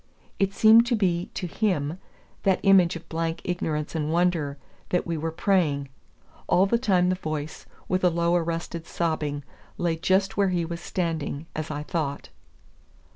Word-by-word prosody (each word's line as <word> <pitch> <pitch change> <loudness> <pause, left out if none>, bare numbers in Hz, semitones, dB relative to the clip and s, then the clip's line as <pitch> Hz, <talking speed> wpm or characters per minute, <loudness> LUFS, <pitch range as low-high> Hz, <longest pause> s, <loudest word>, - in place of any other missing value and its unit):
It 195 0 +2
seemed 225 +3 +6
to 240 - +2
be 185 -2 0
to 185 - -3
him, 175 -4 -1 0.4
that 190 -2 +2
image 190 -3 +5
of 165 0 -9
blank 165 0 -2
ignorance 155 -4 -2
and 155 -2 -1
wonder, 165 -4 +1 0.3
that 180 - +1
we 170 - -2
were 160 +1 -2
praying. 160 -6 +1 0.6
All 185 - +4
the 235 +4 +1
time 185 -7 +3
the 185 - +2
voice, 155 -4 -5 0.2
with 185 0 0
a 180 - +6
low 170 +1 +1
arrested 165 0 -2
sobbing, 150 -4 -2 0.3
lay 170 -2 0
just 190 +4 +1
where 200 -1 +3
he 175 -2 0
was 170 +1 -6
standing, 165 -4 -3
as 155 -1 -3
I 150 -1 -4
thought. 150 -3 -3
170 Hz, 165 wpm, -26 LUFS, 155-185 Hz, 0.6 s, seemed